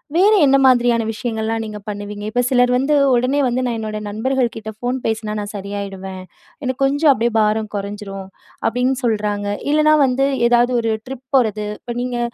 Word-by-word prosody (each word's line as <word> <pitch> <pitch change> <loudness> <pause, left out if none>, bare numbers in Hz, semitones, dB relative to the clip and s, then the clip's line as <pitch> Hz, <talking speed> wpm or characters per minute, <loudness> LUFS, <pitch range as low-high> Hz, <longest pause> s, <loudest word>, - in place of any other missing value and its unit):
வேற 380 +4 +5 0.2
என்ன 275 0 +5
மாதிரியான 245 -2 +4
விஷயங்கள்லாம் 225 0 -3
நீங்க 215 -1 -7
பண்ணுவீங்க? 205 0 -6
இப்ப 245 +3 +1
சிலர் 245 -1 +3
வந்து, 270 +4 +1 0.2
"உடனே 255 +4 +1
வந்து 250 +1 -1
நான் 240 -2 -1
என்னோட 215 -1 -4
நண்பர்கள்கிட்ட 225 0 -2
ஃபோன் 245 +3 -2
பேசினா 220 -1 -2
நான் 205 0 -5
சரியாயிடுவேன். 195 -1 -6 0.4
எனக்கு 260 +1 -3
கொஞ்சம் 285 +2 +4
அப்பிடியே 235 -2 +1
பாரம் 215 0 +1
குறைஞ்சிரும்." 200 -1 -6 0.4
அப்பிடின்னு 250 +2 0
சொல்றாங்க. 210 -3 -1 0.2
இல்லன்னா, 305 0 +4
வந்து 265 +1 +1 0.2
ஏதாவது 240 +1 +3
ஒரு 225 -1 0
ட்ரிப் 265 0 -8
போறது. 215 -3 0
இப்ப 240 -1 -7
நீங்க, 245 -1 -3
230 Hz, 160 wpm, -19 LUFS, 210-255 Hz, 0.4 s, வேற